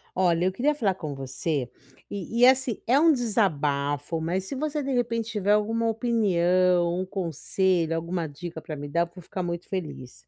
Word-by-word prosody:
Olha, 175 -1 +2
eu 185 - +2
queria 275 +10 +1
falar 200 -9 +1
com 155 -5 -5
você 135 0 -3 0.4
e 205 +3 -4
e, 245 - +8
assim, 260 -3 +2
é 250 +4 +5
um 325 +1 +6
desabafo, 155 - 0
mas 180 +4 -1
se 275 - -5
você, 300 +2 -2
de 275 0 -3
repente 230 -2 0
tiver 205 -2 0
alguma 225 +2 +2
opinião, 185 -6 +2
um - - -3
conselho, 180 -1 0
alguma 170 0 -2
dica 160 +3 -8
pra 155 -2 -6
me 145 +1 -6
dar, 170 +4 +1
eu 170 0 -2
vou 180 - -11
ficar 185 +2 -5
muito 170 0 -4
feliz. 155 -9 -5
185 Hz, 185 wpm, -26 LUFS, 165-225 Hz, 0.4 s, e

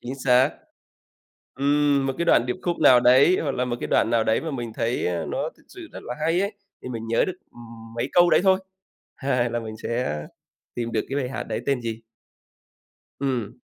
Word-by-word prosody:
chính 125 +2 -6
xác. 130 +2 +5 1.1
Ừm, 145 0 +2
một 135 - -1
cái 170 - -1
đoạn 145 -7 +4
điệp 125 - -2
khúc 175 -1 -2
nào 125 - +7
đấy, 130 +9 +5
hoặc 145 - -1
là 125 - 0
một 120 -1 -2
cái - - -4
đoạn - - +2
nào 115 -1 +2
đấy 110 0 +1
mà 160 - -4
mình 120 -5 -5
thấy, 115 +2 -1
á, 85 -2 -2
nó 275 - -2
thật - - -24
sự 360 -4 -11
rất - - -10
là - - -5
hay 165 +3 +2
ấy, 200 +2 -2 0.3
thì - - -6
mình 115 -2 -5
nhớ 115 - +2
được, 185 - -3 0.2
ừm, 115 -1 -13
mấy 120 +3 -2
câu 175 0 +6
đấy 155 0 +4
thôi, 190 -1 +4 0.6
hai 125 -3 0
là 120 0 -2
mình 110 -1 -7
sẽ 115 -10 -2 0.5
tìm 115 -1 -3
được 110 - 0
cái 135 - -3
bài 130 -3 -2
hát 130 - -4
đấy - - -4
tên 140 -3 +1
gì. 115 -1 -4 1.2
Ừm. 130 -6 -2
125 Hz, 220 wpm, -24 LUFS, 115-145 Hz, 1.2 s, nào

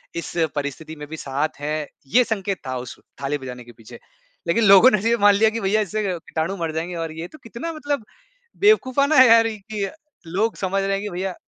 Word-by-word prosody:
इस 170 - -5 0.2
परिस्थिति 145 +2 -5
में 150 -1 -9
भी 160 +1 -7
साथ 140 +3 -3
हैं, 150 +1 -3 0.2
ये 250 - +4
संकेत 200 -4 -2
था 130 - -3
उस 125 -1 -8 0.2
थाली 140 +2 -1
बजाने 125 -3 -8
के 120 - -14
पीछे, 110 -1 -14 0.5
लेकिन 220 +7 +2
लोगों 200 +5 +8
ने 215 - +2
ये 235 - +3
मान 205 -1 +6
लिया 220 +2 +4
कि 230 - -4
भैईया 205 +2 +2
इससे 215 +2 -2 0.2
कीटाणु 165 +4 -3
मर 165 -2 -2
जाएँगे 170 +2 -3
और 165 -1 -4
ये 170 - -5
तो 310 - -15
कितना 235 +8 -6
मतलब 290 -5 -3 0.6
बेवकूफ़ाना 280 -8 +4
हैं 260 -1 +9
यार 230 0 +6
कि 210 -1 -5 0.4
लोग 210 +7 0
समझ 195 +1 -1
रहे 195 - -1
हैं 195 - -1
कि 210 - -4
भैईया 185 0 -4
195 Hz, 215 wpm, -22 LUFS, 155-225 Hz, 0.6 s, हैं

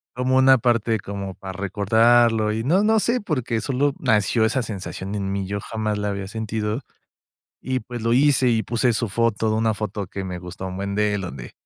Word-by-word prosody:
Como 125 +1 +1
una 130 0 +6
parte, 115 -2 +1
como 100 -1 -6
para 95 0 -8
recordarlo 110 +3 +3
y 110 +1 -2
no 175 - +3
no 220 +1 +4
sé 240 +4 0
porque 130 - -2
solo 135 +4 0
nació 110 -2 +2
esa 125 +4 +1
sensación 100 -2 -6
en 100 -1 -2
mí. 100 -1 -2
Yo 100 +1 -3
jamás 110 -1 -3
la 105 0 -2
había 100 -1 -4
sentido 110 +2 -3 0.8
y 130 0 -1
pues, 120 +1 -7
lo 115 +1 +1
hice 135 0 +4
y 110 -3 +1
puse 120 +2 +1
su 115 0 -1
foto, 110 0 0
una 110 0 +2
foto 105 -2 -4
que 95 +1 -5
me 90 -1 -5
gusta 90 +1 -8
un 95 0 -6
buen 100 +1 -3
de 105 0 +2
él, 105 - -1
donde, 70 -10 -7
110 Hz, 205 wpm, -23 LUFS, 100-120 Hz, 0.8 s, una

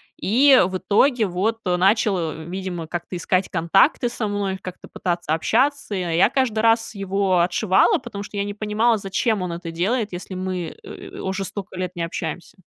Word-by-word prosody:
и, 265 +6 +5
в 185 +1 -2
итоге, 225 +5 +2
вот, 200 +5 -1
э, 180 -1 +2
начал, 195 +2 +3
э, 160 +1 -8
видимо, 180 -2 -5
как-то 175 +2 -5
искать 185 +2 0
контакты 195 - +3
со 235 -2 -3
мной, 200 -2 -2
как-то 185 -1 -9
пытаться 175 -3 -2
общаться, 275 - +1
и 190 - -1
я 175 -2 -2
я 170 +5 +4
каждый 255 -4 0
раз 225 0 +2
его 195 -1 +1
отшивала, 185 +2 +3
потому 200 0 -7
что 205 - -8
я 200 - 0
не 205 - -4
понимала, 215 +2 +1
зачем 200 +2 -1
он 180 -1 -3
это 170 0 -6
делает, 205 +5 -1
если 180 +1 -6
мы, 185 -3 -4
э, - - -10
уже 190 +1 -3
столько 195 0 -6
лет 185 -1 -3
не 170 - -2
общаемся. 170 +5 -5
195 Hz, 190 wpm, -22 LUFS, 180-215 Hz, -, и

